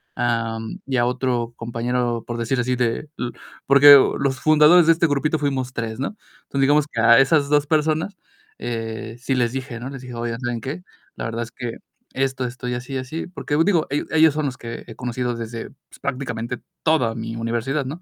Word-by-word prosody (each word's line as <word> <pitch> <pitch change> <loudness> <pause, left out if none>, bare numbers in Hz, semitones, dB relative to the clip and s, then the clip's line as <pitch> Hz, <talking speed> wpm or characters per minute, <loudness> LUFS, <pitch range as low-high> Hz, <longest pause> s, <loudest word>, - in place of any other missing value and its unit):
am, 115 -2 -2
y 135 -1 0
a 120 - +3
otro 125 -2 -1
compañero, 120 0 -2
por 120 -1 -5
decir 125 +3 0
así 125 +1 0
de 125 +4 -1
l 120 - -2 0.4
porque 140 +1 +9 0.2
los 135 -2 -1
fundadores 155 +2 +6
de 165 - +8
este 170 +1 +1
grupito 150 +1 +1
fuimos 135 -3 -2
3 115 -1 -4
¿no? 140 +10 -3 0.3
Entonces, 140 - -1
digamos 145 +2 +4
que 115 - -1
a 115 +2 +7
esas 140 +1 +3
2 145 0 +3
personas, 160 +5 0 0.4
eh, 115 -2 -5
sí 130 +1 -1
les 120 -2 +1
dije, 130 -2 -5
¿no? 125 +3 -6
Les 135 -2 -8
dije: 125 -2 -9
"Oye, 115 0 -3
¿saben 120 -1 -2
qué? 140 +10 -5 0.3
La - - -5
verdad 115 +1 -3
es 115 - -10
que 120 -2 -5 0.4
esto, 130 -1 -1
esto, 125 0 -6
y 125 - -1
así, 125 +2 -6
y 135 - -1
así". 130 +6 -5
Porque 160 -4 -3
digo, 170 -4 +2
el 145 - -1
ellos 160 -2 +5
son 150 -2 -1
los 125 - -5
que 115 -1 -7
he 115 - -10
conocido 125 0 -3
desde, 115 0 -6
pues, - - -20
prácticamente 125 -3 -3 0.2
toda 150 -8 +2
mi 115 0 -5
universidad, 120 +5 -1
¿no? 150 +7 -6
125 Hz, 205 wpm, -22 LUFS, 115-145 Hz, 0.4 s, porque